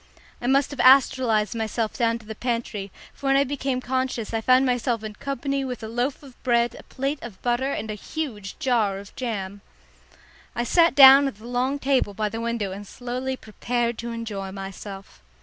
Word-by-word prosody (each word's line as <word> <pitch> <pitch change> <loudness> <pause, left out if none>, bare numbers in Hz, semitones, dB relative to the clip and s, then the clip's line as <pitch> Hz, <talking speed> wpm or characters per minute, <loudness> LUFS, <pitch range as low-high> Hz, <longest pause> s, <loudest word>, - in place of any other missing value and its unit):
I 240 - -2
must 275 +2 +3
have 285 - -8
astralised 255 -5 +5
myself 225 0 -2
down 230 -1 +1
to 225 - -16
the 220 - -6
pantry, 230 -4 -3 0.2
for 280 - -6
when 270 - +4
I 275 - +5
became 270 -2 -2
conscious 255 -3 -2
I 225 - 0
found 255 +3 +4
myself 245 -2 0
in 215 -1 -5
company 275 +3 -3
with 250 -3 -5
a - - -4
loaf 245 +6 -2
of 265 -3 -15
bread, 235 -1 +2
a - - -9
plate 275 +2 -3
of 225 -6 -9
butter 245 +3 +1
and 220 -5 -3
a - - -3
huge 210 -3 -5
jar 225 -7 +1
of 200 +1 -11
jam. 205 -5 -4 0.9
I 240 - 0
sat 335 +5 +4
down 275 0 +9
at 270 - -4
the 215 +3 -15
long 250 +3 0
table 265 -7 +1
by 215 0 -1
the 225 +2 -5
window 230 -4 -2
and 200 +1 -8
slowly 255 +3 -4
prepared 235 +1 -2
to 235 0 -4
enjoy 210 -4 -5
myself. 195 - -9
240 Hz, 195 wpm, -24 LUFS, 215-265 Hz, 0.9 s, down